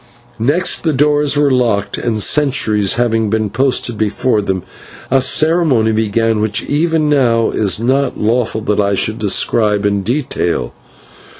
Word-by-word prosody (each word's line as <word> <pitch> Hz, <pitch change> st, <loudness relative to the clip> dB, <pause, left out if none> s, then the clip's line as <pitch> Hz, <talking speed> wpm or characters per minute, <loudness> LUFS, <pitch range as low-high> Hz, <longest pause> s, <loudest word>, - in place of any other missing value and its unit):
Next 145 Hz, +11 st, +1 dB
the 160 Hz, -2 st, -1 dB
doors 145 Hz, +1 st, +1 dB
were 145 Hz, -1 st, +2 dB
locked, 110 Hz, -6 st, 0 dB
and, 110 Hz, -3 st, -1 dB
sentries 110 Hz, -9 st, +1 dB
having 115 Hz, -3 st, 0 dB
been 110 Hz, -1 st, -1 dB
posted 125 Hz, -2 st, -1 dB
before 110 Hz, +1 st, 0 dB
them, 95 Hz, -2 st, -3 dB, 0.5 s
a 135 Hz, 0 st, +3 dB
ceremony 155 Hz, -6 st, +2 dB
began, 110 Hz, 0 st, 0 dB
which 105 Hz, -1 st, -1 dB
even 160 Hz, +1 st, 0 dB
now 120 Hz, -6 st, +2 dB
it -, -, -6 dB
is 105 Hz, -1 st, +1 dB
not 130 Hz, +3 st, 0 dB
lawful 110 Hz, 0 st, -1 dB
that 105 Hz, -1 st, -1 dB
I 100 Hz, -1 st, +1 dB
should 110 Hz, +4 st, -2 dB
describe 105 Hz, 0 st, +1 dB
in 100 Hz, -1 st, 0 dB
detail. 120 Hz, -, -2 dB
115 Hz, 145 wpm, -14 LUFS, 105-140 Hz, 0.5 s, a